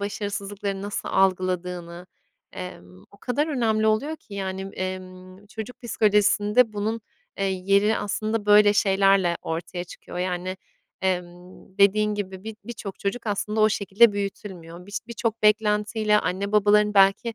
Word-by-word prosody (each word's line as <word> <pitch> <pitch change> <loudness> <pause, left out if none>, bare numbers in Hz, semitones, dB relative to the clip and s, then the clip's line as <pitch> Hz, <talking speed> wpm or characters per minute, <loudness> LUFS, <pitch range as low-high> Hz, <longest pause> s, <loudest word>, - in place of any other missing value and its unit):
başarısızlıklarını 200 -1 -4
nasıl 205 0 -4
algıladığını, 180 -2 -1 0.5
emm, 90 - -10
o 200 - -18
kadar 285 +5 0
önemli 225 -7 +1
oluyor 280 +9 +1
ki, 205 - -14
yani, 190 -1 -4
emm, 185 +1 -7
çocuk 220 +3 -8
psikolojisinde 210 0 +3
bunun, 215 +2 -2 0.4
eee, 195 - 0
yeri 200 +3 +2
aslında 215 +1 -2
böyle 205 0 +7
şeylerle 195 -3 +3
ortaya 175 +2 -4
çıkıyor. 175 - -10
Yani, 180 +1 -2 0.5
emm, 180 +1 -4
dediğin 210 +1 +4
gibi, 190 -2 -6
bi 220 0 -6
birçok 210 -5 -7
çocuk 225 +4 -3
aslında 210 +1 -1
o 215 - +6
şekilde 205 +2 +4
büyütülmüyor. 185 -3 -6
Biş 205 - -4
birçok 230 -1 -3
beklentiyle 210 0 +2
anne 195 +4 -2
babaların 210 0 +4
belki 195 +4 +4
200 Hz, 130 wpm, -24 LUFS, 185-215 Hz, 0.5 s, böyle